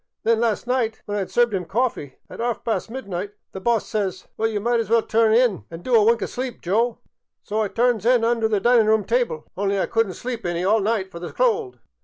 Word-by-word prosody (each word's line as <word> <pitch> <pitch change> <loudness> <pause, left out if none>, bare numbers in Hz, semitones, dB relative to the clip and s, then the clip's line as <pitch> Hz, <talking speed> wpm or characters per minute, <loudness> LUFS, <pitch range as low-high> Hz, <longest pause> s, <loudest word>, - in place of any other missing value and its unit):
An' 230 - +4
then 225 - +3
las' 230 -2 0
night 245 -3 -1
when 205 - -4
I - - 0
'd - - -17
served 240 -2 +2
'em 185 -2 -2
coffee 205 - -2
at - - -8
'arf 235 -2 -2
past 225 -1 -2
midnight, 205 -5 -5 0.2
the 190 - -7
boss 235 0 +1
says, 195 -4 -3
' - - -47
Well, 225 0 0
ye 215 - -2
might 235 +3 +1
as 225 - -2
well 230 0 +4
turn 225 0 +2
in 230 -3 +2
an' 165 +1 -9
do 255 - -2
a 225 -2 +6
wink 230 +2 +3
o' - - 0
sleep, 255 -1 -5
Joe.' 225 +6 0 0.5
So 215 +1 -1
I 215 - +1
turns 235 0 +1
in 240 0 +3
under 230 -1 +2
the 215 -2 +1
dinin' 235 +1 +4
room 220 -1 +3
tyble; 485 -1 0
only 200 0 0
I - - +1
could 225 -1 +1
n't 185 - -7
sleep 240 -2 -5
any 175 0 -2
all 215 +3 +4
night 205 -2 -1
fer 170 - -8
the 175 - -6
cold. 450 -5 0
225 Hz, 260 wpm, -23 LUFS, 200-240 Hz, 0.5 s, a